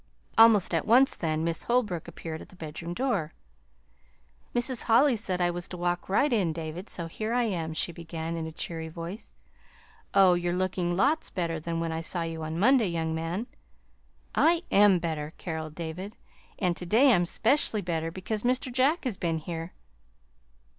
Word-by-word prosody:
Almost 225 -5 +6
at 165 - 0
once, 255 +5 +5
then, 155 -2 -1
Miss 165 0 -2
Holbrook 215 -9 0
appeared 160 -1 -7
at - - -12
the - - -16
bedroom 165 +1 -6
door. 200 - -1 1.2
"Mrs. 240 +1 -1
Holly 255 +4 +5
said 190 -4 -2
I 175 -1 +2
was 175 0 -5
to 180 - -7
walk 175 +1 -2
right 255 +8 +3
in, 185 -8 +2
David, 165 +4 -6
so 170 - -4
here 215 +7 -4
I 245 0 +2
am," 165 -7 -2
she 170 - -1
began, 165 0 -5
in 160 -1 -3
a - - -6
cheery 160 0 -5
voice. 170 +6 -8 0.8
"Oh, 190 -2 +7
you're 175 0 0
looking 180 -1 -1
lots 295 - +2
better 170 -3 -2
than 165 +1 -3
when 165 0 -2
I 160 0 -3
saw 170 +1 -1
you 165 -1 -4
Monday, 200 +10 +3
young 165 -2 -2
man!" 165 +7 -3 0.9
"I 335 +1 +3
am 200 -2 +6
better," 160 -3 -3
caroled 160 -3 -5
David; 175 +6 -6 0.4
"and 180 -4 0
to 180 - -6
day 245 +7 +5
I'm 175 -3 +2
'specially 225 - +2
better, 165 -2 -2
because 190 +5 -4
Mr. 250 +1 0
Jack 275 +7 +2
has 245 -8 -2
been 165 -2 -1
here." 165 +2 -5
175 Hz, 175 wpm, -28 LUFS, 165-220 Hz, 1.2 s, Oh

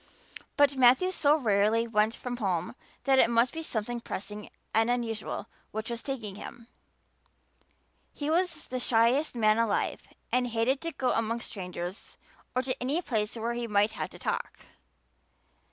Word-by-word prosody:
But 285 -1 +4
Matthew 260 +9 +5
so 300 -5 +4
rarely 220 -2 +2
went 215 0 +2
from 245 -1 -5
home 190 -3 -1 0.3
that 270 -1 +4
it - - +6
must 235 +1 +3
be 325 - -4
something 240 -5 -2
pressing 210 -1 -6 0.2
and 225 +2 +3
unusual 230 -3 -2 0.2
which 220 +2 -4
was 235 0 -4
taking 235 -8 -4
him; 225 +3 -9 1.5
he 290 - -5
was 350 +3 0
the 255 - -2
shyest 245 +5 +3
man 215 -1 +3
alive 225 -3 0 0.3
and 250 0 +2
hated 240 +4 +1
to 335 - -5
have 330 - -3
to - - -39
go 255 - +1
among 230 +1 0
strangers 180 -2 -7 0.4
or 255 - +2
to 255 0 -1
any 275 +6 +1
place 220 -5 -1
where 230 +1 -2
he 240 0 -3
might 210 0 +3
have - - -4
to - - -13
talk. - - -3
235 Hz, 165 wpm, -29 LUFS, 215-255 Hz, 1.5 s, it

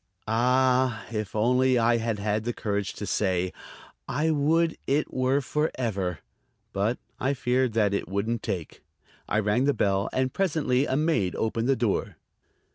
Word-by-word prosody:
Ah, 125 +1 +2
if 105 -2 -4
only 125 +3 +3
I 115 0 +3
had 115 -1 -1
had 105 +1 -1
the 120 +1 -2
courage 100 -2 -2
to 105 - -6
say: 95 -3 0 0.5
"I 155 +4 0
would 160 +3 +2
it 145 +3 0
were 130 +2 +2
for 150 +3 0
ever!" 95 - -2 0.5
But 105 +5 0 0.2
I 135 +2 0
feared 125 -1 +1
that 105 -3 +2
it 100 - -2
wouldn't 105 +4 -1
take. 85 -5 -5 0.5
I - - +1
rang 110 +4 +2
the 145 - +2
bell, 100 +1 +1
and 130 0 0
presently 145 -8 +1
a 130 - 0
maid 150 - +1
opened 115 +2 -1
the 135 - +4
door. 115 -4 -1
120 Hz, 160 wpm, -26 LUFS, 105-130 Hz, 0.5 s, the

